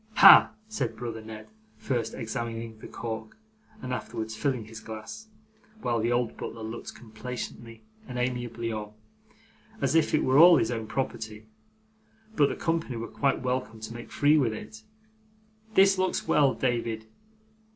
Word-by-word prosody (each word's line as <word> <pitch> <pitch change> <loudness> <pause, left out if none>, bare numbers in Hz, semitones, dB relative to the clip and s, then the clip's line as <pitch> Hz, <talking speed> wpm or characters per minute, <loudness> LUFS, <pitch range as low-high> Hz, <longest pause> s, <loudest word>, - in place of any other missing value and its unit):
'Ha!' - - +10 0.2
said 220 0 -3
brother 115 -2 -5
Ned, 110 0 -9 0.3
first 115 -1 -2
examining 115 0 -5
the - - -9
cork 110 - -6 0.5
and 125 - -3
afterwards 110 -3 -4
filling 125 -2 -1
his 110 +1 -10
glass, 110 - -8 0.6
while 120 -1 +1
the 115 +2 0
old 120 -1 0
butler 115 - -6
looked 110 +2 -7
complacently 115 0 -8 0.2
and 125 - -6
amiably 120 -2 -2
on, 105 -1 -5 0.9
as 140 0 +1
if 160 -2 +3
it - - +2
were 130 +2 +4
all 170 0 +9
his 115 - +1
own 110 -2 -3
property, 110 -4 -4 0.9
but 145 -6 +4
the - - -3
company 165 -6 -1
were 115 0 -4
quite 135 -2 0
welcome 125 -3 -2
to 110 +1 -7
make 120 0 -9
free 150 +2 +4
with 120 -6 +1
it, 220 - -9 0.9
'this 195 0 +6
looks 185 0 0
well, 140 -3 +4
David. 115 -3 -1
120 Hz, 150 wpm, -28 LUFS, 110-135 Hz, 0.9 s, Ha